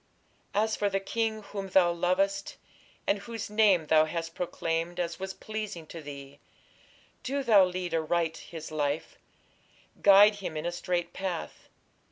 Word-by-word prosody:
As 215 +1 +2
for 205 - 0
the 195 0 0
king 220 +2 -2
whom 200 -1 -6
thou 180 -2 +5
lovest, 190 +3 0 0.5
and 200 - +1
Whose 225 0 -6
name 205 -6 +4
thou 155 0 +5
hast 165 +1 -4
proclaimed 170 0 -2
As 170 -1 -2
was 190 0 -4
pleasing 215 -6 -6
to 165 +1 -9
thee, 140 -1 -10 0.8
Do 275 +2 -2
thou 210 -6 +6
lead 180 -1 -4
aright 165 0 0
his 160 -2 -9
life, 145 0 -2 0.8
Guide 205 +1 +7
him 185 -6 -5
in 155 - -4
a 175 - 0
straight 175 0 -2
path. 185 -4 -5
180 Hz, 150 wpm, -29 LUFS, 165-205 Hz, 0.8 s, Guide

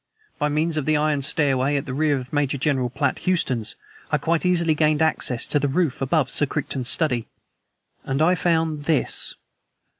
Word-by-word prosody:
By 150 -1 +1
means 155 +2 0
of 150 - -1
the 155 -1 +3
iron 150 -1 +1
stairway 140 -1 +1
at 140 - -3
the 130 - -5
rear 150 0 +1
of 130 +1 -8
Major 145 -1 0
General 130 -3 0
Platt - - -1
Houston's, 130 - 0 0.3
I - - +2
quite 170 +2 0
easily, 170 -3 +2
gained 155 -1 +2
access 160 -6 0
to 145 - 0
the 145 - 0
roof 145 -1 0
above 135 0 +1
Sir 145 - +1
Crichton's 135 -3 -3
study 125 -8 +1 0.8
and 135 +1 -2
I 165 +4 +4
found 160 -3 0
this." 155 -4 +1
150 Hz, 180 wpm, -23 LUFS, 135-160 Hz, 0.8 s, I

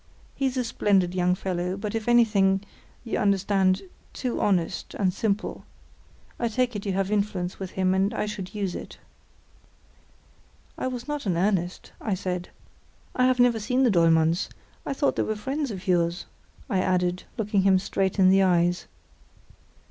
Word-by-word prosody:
He's 265 -1 -1
a 255 - +1
splendid 195 -6 +1
young 180 0 +2
fellow, 180 0 -2
but 205 0 -4
if 225 0 -3
anything—you 210 -1 +1
understand—too 195 +3 0
honest 180 -5 0
and 185 -3 +1
simple. 210 +1 -2 0.8
I 235 - +1
take 245 +1 0
it 205 0 -4
you 195 - 0
have 195 +1 -1
influence 200 -3 -1
with 190 -1 -5
him, 185 0 +2
and 195 +2 +2
I 220 - -2
should 205 -2 -6
use 195 -4 -2
it." - - -8 1.8
"I - - -3
was 250 0 -5
not 295 -6 -3
in 175 -3 +1
earnest," 180 -1 -1
I 210 -4 -1
said. 180 -1 -4 0.7
"I 255 - +3
have 255 -1 +2
never 245 -2 +4
seen 250 +5 +1
the 245 - +4
Dollmanns; 165 0 +3 0.4
I - - -1
thought 280 +1 0
they - - +2
were 215 - -1
friends 270 +7 -3
of 190 -3 -7
yours," 175 -1 +1 0.4
I 200 -8 0
added, 180 -1 0
looking 210 -2 +1
him 190 0 +5
straight 190 +1 -1
in 185 -1 +6
the 195 0 +5
eyes. 175 -1 +2
195 Hz, 160 wpm, -26 LUFS, 185-220 Hz, 1.8 s, in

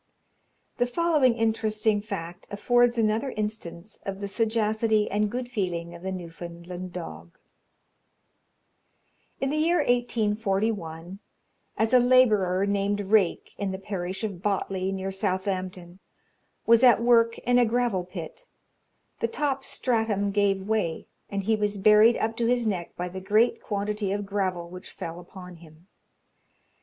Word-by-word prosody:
The 245 - +2
following 295 -3 +2
interesting 220 -1 +1
fact 180 -4 -7
affords 240 +3 +2
another 225 +4 +1
instance 210 -3 -5
of 195 0 -5
the 200 - -4
sagacity 220 0 +1
and 210 +1 +1
good 245 +2 -5
feeling 175 -6 -3
of 170 - -11
the 190 +1 -4
Newfoundland 175 0 -7
dog: 85 - -8 2.0
In 270 0 -1
the 305 - -1
year 335 +3 +3
1841, 210 - -1 0.6
as 220 +2 +1
a 250 - +8
labourer, 215 -7 +4
named 200 0 0
Rake, 200 -2 +1
in 200 -1 -1
the 190 - -3
parish 190 0 -5
of 195 -5 -4
Botley, 190 -1 -1
near 195 0 -3
Southampton, 185 -2 -3 0.7
was 230 0 +6
at 250 -2 +6
work 230 -1 +4
in 245 0 +2
a 245 - +5
gravel 235 -5 0
pit, 180 - -9 0.7
the 230 - +1
top 275 +2 -2
stratum 220 -7 0
gave 195 -1 +1
way, 210 -7 -1 0.2
and 200 -1 -3
he 220 +3 +2
was 210 -1 -1
buried 215 +3 +6
up 225 +1 -1
to 235 - +1
his 240 -1 +1
neck 185 -5 -3
by 180 - -3
the 190 +1 -7
great 215 +5 +2
quantity 205 -1 -2
of 205 0 -2
gravel 190 -4 -2
which 180 +1 -10
fell 165 +1 -7
upon 180 0 -11
him. 160 0 -17
205 Hz, 140 wpm, -26 LUFS, 185-225 Hz, 2.0 s, a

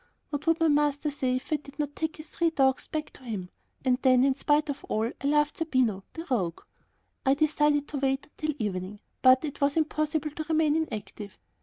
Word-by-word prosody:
What 290 +1 -4
would 330 +1 +3
my 330 - +4
master 295 0 +2
say 260 -3 0
if 255 +4 -3
I - - +3
did 285 -1 -15
not 290 -2 -3
take 320 0 -3
his 310 0 -10
three 335 +2 +1
dogs 270 -4 +2
back 305 -1 -4
to - - -16
him? 200 -7 -5 0.3
And 250 -1 +3
then, 255 -1 +5
in 270 0 +4
spite 295 +2 +2
of 285 -1 -4
all, 220 +2 -1
I 280 - -1
loved 295 0 +2
Zerbino, 255 - +1
the 330 - -6
rogue! 180 -9 0 0.6
I 270 +1 +4
decided 295 -1 +2
to 285 - -3
wait 270 0 0
until 305 0 -4
evening, 205 -2 -4 0.2
but 255 +3 +6
it 290 -1 -6
was 280 +2 +2
impossible 305 -1 0
to 310 +2 -5
remain 310 -2 +3
inactive. 215 -9 -4
290 Hz, 205 wpm, -28 LUFS, 255-305 Hz, 0.6 s, but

